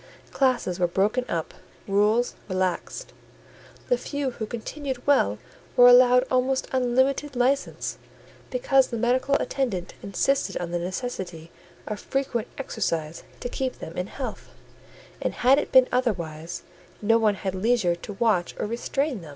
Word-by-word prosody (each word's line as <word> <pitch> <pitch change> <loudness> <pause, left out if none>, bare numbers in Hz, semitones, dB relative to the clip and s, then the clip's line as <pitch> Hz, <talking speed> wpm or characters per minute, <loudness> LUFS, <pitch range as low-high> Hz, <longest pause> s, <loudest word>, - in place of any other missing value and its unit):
Classes 245 -9 +1
were 175 - +3
broken 210 +8 +1
up, 165 -2 -2 0.3
rules 210 +4 +2 0.2
relaxed. 185 - -2 0.7
The - - +2
few 285 -2 -3
who 220 -3 -5
continued 255 +3 -5
well 105 - +3 0.4
were 245 0 +9
allowed 250 0 +7
almost 260 +1 +1
unlimited 260 +3 +1
license; 255 +3 0 0.5
because 275 - +3
the 235 - -4
medical 255 +4 +2
attendant 230 -12 -1
insisted 270 +8 0
on 170 -1 -4
the 175 - -1
necessity 180 -4 -5 0.3
of 210 -1 -4
frequent 255 -4 -2
exercise 165 - -2 0.2
to - - -2
keep 260 +1 -3
them 165 - -8
in 180 +1 -2
health: 270 - -6 0.7
and - - -1
had 265 +3 +5
it - - -4
been 260 -1 +7
otherwise, 175 -9 -2 0.4
no 225 +2 +4
one 215 -2 +3
had 190 -1 -3
leisure 200 -2 +2
to 175 +4 -8
watch 195 -4 +1
or - - -2
restrain 240 +2 -2
them. 160 - -11
235 Hz, 145 wpm, -25 LUFS, 185-260 Hz, 0.7 s, were